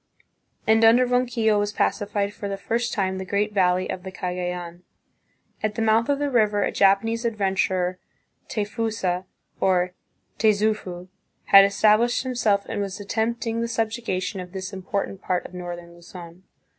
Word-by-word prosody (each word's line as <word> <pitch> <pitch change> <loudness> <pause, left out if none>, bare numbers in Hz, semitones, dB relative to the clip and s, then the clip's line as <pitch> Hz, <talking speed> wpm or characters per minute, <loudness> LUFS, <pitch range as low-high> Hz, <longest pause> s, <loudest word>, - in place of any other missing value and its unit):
And 220 +1 +4
under 235 +3 +6
Ronquillo 245 -4 +1
was 205 0 -1
pacified 205 -1 -1
for 200 - -6
the 195 - -3
first 235 +5 -1
time 190 -2 -1
the - - -4
great 205 +3 -1
valley 185 -2 +2
of 180 - -5
the 190 +1 -8
Cagayan. 180 -1 -4 0.8
At 215 -1 -1
the 225 - -1
mouth 225 +3 +3
of 285 - +2
the 290 0 -1
river 210 -4 +2
a - - 0
Japanese 215 +4 +2
adventurer, 190 -4 0 0.5
Tayfusa, 205 -4 -2 0.3
or 180 -1 +2 0.5
Tayzufu, 210 -4 +1 0.4
had 195 0 +8
established 215 +5 +3
himself 220 -6 +1
and 220 -2 -3
was 200 0 -4
attempting 225 +2 -2
the 235 - -1
subjuga 225 -3 -2
tion 195 - -4
of 180 0 -10
this 190 0 -6
important 195 0 -4
part 180 -1 -1
of - - -10
northern 175 -1 -7
Luzon. 175 +1 -12
200 Hz, 155 wpm, -24 LUFS, 185-225 Hz, 0.8 s, had